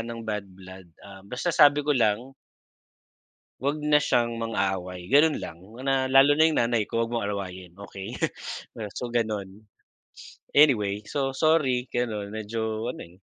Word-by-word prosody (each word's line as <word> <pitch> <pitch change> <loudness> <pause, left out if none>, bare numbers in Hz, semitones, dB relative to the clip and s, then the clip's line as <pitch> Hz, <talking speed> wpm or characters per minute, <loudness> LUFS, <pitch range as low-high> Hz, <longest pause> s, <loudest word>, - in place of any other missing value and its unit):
ng 115 - -7
bad 105 -2 -2
blood, 95 0 -13 0.2
ah, 100 -1 -12
basta 125 - -3
sabi 145 0 +6
ko 150 - +2
lang 120 +3 0 1.3
Huwag 140 +4 0
na 150 0 +4
siyang 120 -4 0
mang-away, 95 -5 -2
ganun 150 +2 +5
lang, 85 - -7 0.3
na 135 -1 +1
lalo 135 +2 +6
na - - +6
'yung 155 - +1
nanay 115 -2 +1
ko 115 0 0
huwag 115 - -8
mong 115 -3 -1
awayin 95 -3 -6
okey. 100 +2 -8 0.8
So 120 -1 -4
gano'n. 105 -3 -3 0.9
Anyway, 105 -9 +4
so 135 +4 -2
sorry 145 -6 +2
gano'n 105 -4 -3
medyo 110 +1 -3
ano - - -8
eh. 85 +1 -18
115 Hz, 150 wpm, -26 LUFS, 100-135 Hz, 1.3 s, sabi